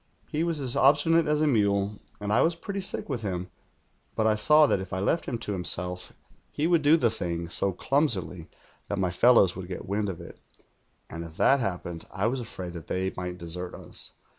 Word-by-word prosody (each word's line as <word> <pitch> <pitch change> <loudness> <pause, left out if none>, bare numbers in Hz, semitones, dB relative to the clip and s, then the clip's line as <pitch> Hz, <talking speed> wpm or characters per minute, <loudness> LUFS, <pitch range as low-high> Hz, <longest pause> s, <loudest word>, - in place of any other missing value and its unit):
"He 155 +2 -1
was 165 -3 -1
as 130 -3 -1
obstinate 150 +4 +4
as 150 0 +1
a - - +4
mule, 100 -4 +1 0.2
and 105 0 -2
I 115 - +4
was 165 +1 +2
pretty 195 +3 -5
sick 190 - -2
with 130 -5 -3
him; 90 -3 -4 0.6
but 110 - +1
I 110 - +4
saw 150 +8 +5
that 120 - +1
if 95 -1 -7
I 95 - -1
left 100 - 0
him 120 - -2
to 115 -2 -4
himself 90 -1 -2 0.5
ho 155 +3 +1
would 170 -2 +4
do 150 +3 +5
the 120 -7 +2
thing 85 -5 -4
so 95 +3 +1
chimsily 95 - -1 0.4
that 100 - -3
my 95 -2 0
fellows 100 -1 +5
would 90 -1 -7
get 90 - -6
wind 105 +1 -1
of 90 -2 -6
it, 85 - -11 0.7
and 85 +1 -7
if 80 -1 -11
that 140 - +4
happened 90 -6 -4
I 95 - -2
was 125 +3 0
afraid 95 -7 -7
that 85 -3 -9
they 95 +1 -2
might 90 0 -5
desert 90 +1 -6
us. - - -7
100 Hz, 215 wpm, -27 LUFS, 90-140 Hz, 0.7 s, saw